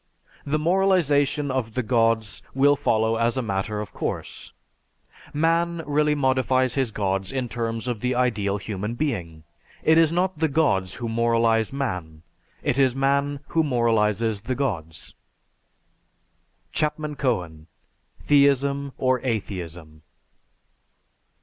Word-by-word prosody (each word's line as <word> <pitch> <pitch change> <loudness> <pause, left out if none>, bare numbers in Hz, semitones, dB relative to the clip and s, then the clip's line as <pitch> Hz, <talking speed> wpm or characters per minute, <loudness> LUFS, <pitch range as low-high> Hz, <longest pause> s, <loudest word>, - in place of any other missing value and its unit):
The 145 +2 +1
moralization 150 -5 +2
of 120 -4 -3
the 130 - 0
Gods 115 -2 +1
will 145 +2 +5
follow 115 -5 +1
as 115 +2 +1
a 130 - 0
matter 105 0 -2
of 105 - -8
course. - - -5 0.8
Man 165 +2 +1
really 150 +1 +2
modifies 130 -2 +2
his 130 -3 0
Gods 95 -2 -2
in 130 -2 -2
terms 115 +1 -3
of 120 -3 -2
the 125 +3 -1
ideal 105 -5 0
human 105 +3 -4
being. 90 - -3 0.4
It 160 +1 +5
is 160 -1 +4
not 180 0 0
the 160 - +3
Gods 115 - +1
who 120 - -4
moralize 115 -1 +2
man, 90 - -4 0.4
it 135 - 0
is 130 -2 +3
man 140 +1 0
who 165 - +2
moralizes 115 -5 +1
the 130 +4 -3
Gods." 90 - -4 1.6
(_Chapman 150 0 -1
Cohen: 90 - -2 0.6
"Theism 140 -1 +2
or 130 -2 +1
Atheism." 90 -9 -5
125 Hz, 125 wpm, -24 LUFS, 105-140 Hz, 1.6 s, will